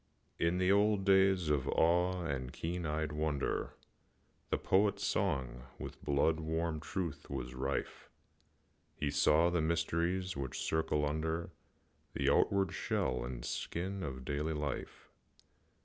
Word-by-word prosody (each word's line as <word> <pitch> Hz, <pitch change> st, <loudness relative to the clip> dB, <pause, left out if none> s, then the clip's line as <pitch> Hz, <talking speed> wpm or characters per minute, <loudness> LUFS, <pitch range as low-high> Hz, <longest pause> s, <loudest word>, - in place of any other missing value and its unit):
I. -, -, +2 dB
In 85 Hz, +2 st, +2 dB
the 90 Hz, +1 st, +3 dB
old 100 Hz, -1 st, +3 dB
days 95 Hz, -3 st, +4 dB
of 75 Hz, -3 st, +1 dB
awe 90 Hz, +2 st, +2 dB
and 65 Hz, -6 st, -3 dB
keen 85 Hz, 0 st, -3 dB
eyed 75 Hz, 0 st, -1 dB
wonder, 75 Hz, -2 st, -1 dB, 0.7 s
The -, -, +1 dB
Poet's 100 Hz, +1 st, +2 dB
song 65 Hz, -, -1 dB
with -, -, -8 dB
blood 75 Hz, +3 st, +2 dB
warm 80 Hz, 0 st, -1 dB
truth 80 Hz, -1 st, -4 dB
was 65 Hz, -2 st, -4 dB
rife; 65 Hz, +2 st, -3 dB, 0.9 s
He 75 Hz, -2 st, -1 dB
saw 80 Hz, +4 st, +4 dB
the 85 Hz, -2 st, +1 dB
mysteries 85 Hz, +3 st, 0 dB
which 65 Hz, -2 st, -4 dB
circle 75 Hz, -2 st, 0 dB
under 80 Hz, +3 st, -2 dB, 0.6 s
The -, -, +2 dB
outward 100 Hz, -1 st, +3 dB
shell 65 Hz, -2 st, -1 dB
and -, -, -5 dB
skin 95 Hz, +3 st, -3 dB
of 65 Hz, -6 st, -5 dB
daily 75 Hz, +2 st, -1 dB
life. 75 Hz, -2 st, -5 dB
80 Hz, 135 wpm, -34 LUFS, 70-90 Hz, 0.9 s, days